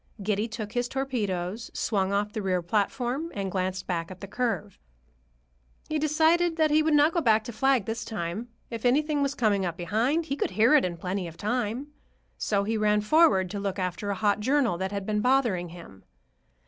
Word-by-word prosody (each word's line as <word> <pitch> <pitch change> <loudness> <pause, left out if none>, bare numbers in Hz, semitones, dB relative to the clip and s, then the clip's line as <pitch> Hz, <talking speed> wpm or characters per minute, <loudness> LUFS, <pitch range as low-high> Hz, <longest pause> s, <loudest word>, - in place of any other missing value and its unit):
Giddy 210 +2 0
took 220 -2 -6
his 245 +1 -1
torpedoes, 220 -6 -3
swung 195 -4 0
off 205 +1 0
the 215 - -3
rear 185 -3 0
platform, 245 - -1
and 195 -2 -3
glanced 185 0 -2
back 170 -2 -2
at 185 -1 -10
the - - -7
curve. 225 -3 -2 1.1
He 310 - 0
decided 320 +3 +2
that 310 -2 +3
he 305 +1 +5
would 310 -1 +2
not 295 +2 +4
go 340 - +1
back 220 -5 +3
to 240 - -6
flag 260 -1 +2
this 225 +1 -3
time. 205 +2 -4 0.2
If 230 -1 -5
anything 290 +4 +2
was 280 0 0
coming 210 -7 +2
up 175 -2 -3
behind, 235 - 0
he 275 - -2
could - - -1
hear 230 +6 +5
it 300 - +5
in 175 -2 -3
plenty 185 +1 -3
of 165 0 -11
time. 245 +4 -2 0.5
So 200 -2 +1
he 220 +2 -1
ran 210 0 +2
forward 210 - +4
to 205 - -3
look 200 -1 -3
after 185 +2 -3
a 200 - 0
hot 205 +1 +1
journal 260 -2 +2
that 190 +1 -2
had 200 -1 -4
been 210 0 0
bothering 235 -9 +2
him. 165 - -12
215 Hz, 200 wpm, -27 LUFS, 190-270 Hz, 1.1 s, he